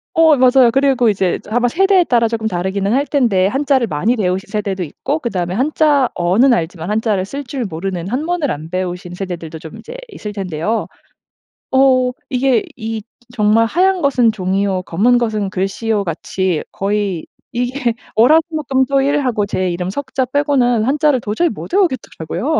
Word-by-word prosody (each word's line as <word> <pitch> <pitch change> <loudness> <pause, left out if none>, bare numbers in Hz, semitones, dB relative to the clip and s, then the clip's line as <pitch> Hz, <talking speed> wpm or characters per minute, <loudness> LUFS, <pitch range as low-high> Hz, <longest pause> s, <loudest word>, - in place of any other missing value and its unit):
어 320 -2 +6
맞아요. 255 -1 +5
그리고 265 -3 +3
이제 190 -3 0
저 - - -14
아마 245 +2 +2
세대에 385 +7 +3
따라 235 -7 +2
쪼금 220 -1 -2
다르기는 190 +2 -1
할 280 +3 +1
텐데 215 -10 +2
한자를 270 0 +1
많이 195 +10 0
배우신 190 -3 -1
세대도 200 -3 -3
있고 175 - -3
그다음에 185 - -3
한자어는 260 - +2
알지만 170 -3 -3
한자를 210 -3 0
쓸 280 +8 -6
줄 255 -1 -4
모르는 180 0 -4
한문을 305 +3 -1
안 155 +2 -6
배우신 180 0 -4
세대들도 175 -4 -6
좀 160 -1 -10
인제 480 - -10
있을 215 - -7
텐데요. 195 +1 -2 0.8
어. 260 -1 +4 0.2
이게 255 -3 +2
이 225 -2 -4 0.3
정말 215 +1 +3
"하얀 370 +6 +2
것은 255 -5 +3
종이요. 190 -1 -1
검은 215 +9 +2
것은 215 -4 -1
글씨요."같이 190 -3 -2
거의 200 -4 -2 0.3
이게 245 0 -1 0.2
월화수목금토일 280 0 +2
하고 215 -5 0
제 185 -1 -1
이름 180 +1 -3
3 265 +6 -6
자 260 -1 +1
빼고는 255 -4 +1
한자를 285 +2 +2
도저히 225 +12 0
못 - - -8
외우겠더라고요. 295 - -1
225 Hz, 355 characters per minute, -17 LUFS, 190-270 Hz, 0.8 s, 어